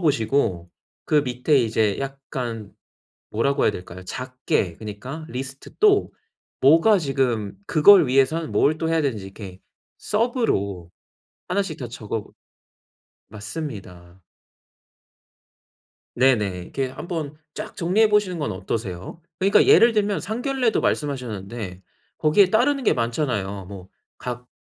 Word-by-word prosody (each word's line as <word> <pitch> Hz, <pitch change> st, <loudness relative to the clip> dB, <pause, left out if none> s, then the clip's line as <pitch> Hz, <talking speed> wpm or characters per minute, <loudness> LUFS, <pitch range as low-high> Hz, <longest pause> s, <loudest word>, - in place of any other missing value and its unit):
보시고 115 Hz, -, 0 dB, 0.3 s
그 155 Hz, -, +1 dB
밑에 125 Hz, +4 st, +1 dB
이제 110 Hz, -4 st, +1 dB
약간 130 Hz, -5 st, -5 dB, 0.6 s
뭐라고 140 Hz, +6 st, +1 dB
해야 -, -, +4 dB
될까요? 90 Hz, 0 st, -9 dB
작게 125 Hz, -6 st, -2 dB
그니까 120 Hz, +9 st, -7 dB
리스트 135 Hz, -1 st, -7 dB
또 410 Hz, -1 st, +4 dB, 0.6 s
뭐가 195 Hz, +7 st, +5 dB
지금 130 Hz, -, -1 dB
그걸 165 Hz, +3 st, +7 dB
위해서는 135 Hz, +5 st, +1 dB
뭘 155 Hz, +2 st, +2 dB
또 160 Hz, -, -1 dB
해야 165 Hz, -1 st, +2 dB
되는지 115 Hz, -9 st, -2 dB
이렇게 95 Hz, -1 st, -10 dB, 0.4 s
서브로 210 Hz, -, -1 dB, 0.6 s
하나씩 180 Hz, -4 st, -1 dB
다 125 Hz, -, -5 dB
적어 110 Hz, -2 st, -5 dB, 1.0 s
맞습니다. 100 Hz, -, -8 dB, 1.9 s
네네. 105 Hz, -8 st, +2 dB
이렇게 135 Hz, +8 st, -3 dB
한번 155 Hz, +1 st, -5 dB, 0.2 s
쫙 -, -, -7 dB
정리해 200 Hz, +6 st, +3 dB
보시는 205 Hz, -5 st, +1 dB
건 145 Hz, -6 st, -2 dB
어떠세요? 95 Hz, -, -5 dB, 0.2 s
그니까 195 Hz, +2 st, +4 dB
예를 235 Hz, 0 st, +6 dB
들면 205 Hz, -2 st, +1 dB
상견례도 245 Hz, +2 st, -1 dB
말씀하셨는데 115 Hz, -8 st, -3 dB, 0.4 s
거기에 180 Hz, +5 st, +4 dB
따르는 265 Hz, +6 st, +2 dB
게 -, -, +4 dB
많잖아요. 115 Hz, -6 st, -2 dB
뭐 95 Hz, -1 st, -10 dB, 0.3 s
각 125 Hz, 0 st, -5 dB
130 Hz, 265 characters per minute, -23 LUFS, 105-165 Hz, 1.9 s, 그걸